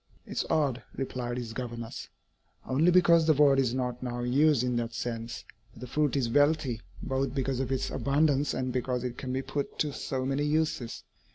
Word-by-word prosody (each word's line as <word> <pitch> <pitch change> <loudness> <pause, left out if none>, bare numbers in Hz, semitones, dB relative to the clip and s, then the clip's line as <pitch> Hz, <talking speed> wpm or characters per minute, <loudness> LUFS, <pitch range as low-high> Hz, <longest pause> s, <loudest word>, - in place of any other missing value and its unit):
"It - - -13
is - - -1
odd," 145 -6 +1
replied 125 -2 -3
his 120 -2 -5
governess, 120 -1 -6 0.6
"only 145 +7 +3
because 170 -2 +5
the 155 - +6
word 140 -1 +5
is 130 -2 +1
not 125 -2 -2
now 120 -1 -3
used 135 +2 +3
in 125 -1 0
that 115 0 -3
sense; 115 -3 -4 0.3
but 115 - -14
the - - -5
fruit 145 +2 0
is 130 -4 +1
wealthy 145 -2 +2 0.2
both 135 0 -1
because 135 -1 -1
of 135 -1 -2
its 130 - -1
abundance 145 0 +2
and 130 -1 -2
because 125 -1 -1
it 125 -1 -3
can 130 - -5
be 130 +1 -1
put 140 +1 -4
to 150 -2 0
so 130 -1 -3
many 135 +2 0
uses. 150 -5 -1
130 Hz, 195 wpm, -29 LUFS, 120-145 Hz, 0.6 s, the